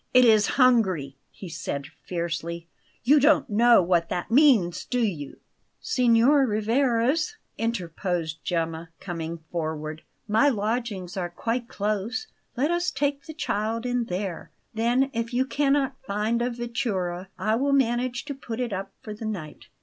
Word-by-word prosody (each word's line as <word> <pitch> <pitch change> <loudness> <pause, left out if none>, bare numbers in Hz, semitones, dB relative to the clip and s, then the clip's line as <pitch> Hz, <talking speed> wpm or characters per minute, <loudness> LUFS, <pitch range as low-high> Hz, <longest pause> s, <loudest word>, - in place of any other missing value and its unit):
"It 250 0 +8
is 215 -3 +5
hungry," 190 - +3
he 190 - -10
said 140 -3 -4 0.2
fiercely. 170 -1 -4 0.4
"You 285 +5 +6
don't 300 +3 +4
know 235 0 +6
what 170 -1 +1
that 175 +5 -3
means, 230 - +4
do 250 - -2
you?" 175 - -2 0.4
"Signor 255 +2 +4
Rivarez," 240 - +1 0.2
interposed 175 -7 -2
Gemma, 165 -1 -2
coming 170 -2 -5
forward, 155 -2 -3 0.3
"my 220 +7 +4
lodgings 210 -5 -2
are 175 -2 -2
quite 230 +7 -2
close. 210 - -2 0.3
Let 290 +6 +2
us 345 +1 +1
take 285 -2 -1
the 315 - -8
child 225 -5 -2
in 245 -1 0
there. 185 -3 -4 0.2
Then, 240 +5 +1
if 230 +1 -3
you 260 +1 +2
cannot 275 -1 +1
find 220 0 -1
a 245 - +1
vettura, 225 -7 -3
I 215 +4 0
will 275 +5 +1
manage 245 -1 +1
to 285 - -4
put 240 -4 -6
it 240 -4 -2
up 195 +1 -4
for 215 -4 -6
the 215 +2 -7
night." 180 -9 -6
225 Hz, 150 wpm, -26 LUFS, 180-250 Hz, 0.4 s, It